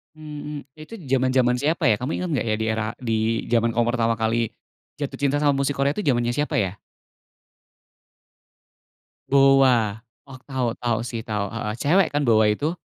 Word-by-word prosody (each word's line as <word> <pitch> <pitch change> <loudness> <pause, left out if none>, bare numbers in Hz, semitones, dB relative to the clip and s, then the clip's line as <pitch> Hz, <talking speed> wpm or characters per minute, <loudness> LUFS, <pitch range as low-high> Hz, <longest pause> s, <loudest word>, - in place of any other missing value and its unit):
Mhm, 150 -1 -7 0.2
itu 155 +8 -11 0.2
zaman-zaman 130 -1 +2
siapa 150 +2 +1
ya? 105 - +3
Kamu 125 +6 -3
inget 180 - -3
gak 115 - -1
ya 110 - 0
di - - 0
era, 110 0 -1
di 115 -2 -2 0.4
zaman 115 -1 +2
kamu 120 0 +2
pertama 115 -1 +1
kali 115 +1 0 0.5
jatuh 145 -2 -5
cinta 145 +1 0
sama 145 -2 +2
musik 140 +1 0
Korea 140 0 +1
itu 210 - -3
zamannya 120 -3 +1
siapa 150 - -1
ya? 100 0 0 2.5
BoA. 130 -6 +4 0.2
Oh, 130 -1 -11
tau 130 -4 -1
tau 120 -2 0
sih 115 -1 -5
tau, 105 -1 -2 0.3
cewek 175 +6 +3
kan 145 0 +1
BoA 110 -1 +5
itu? 155 +7 -2
125 Hz, 165 wpm, -23 LUFS, 115-145 Hz, 2.5 s, BoA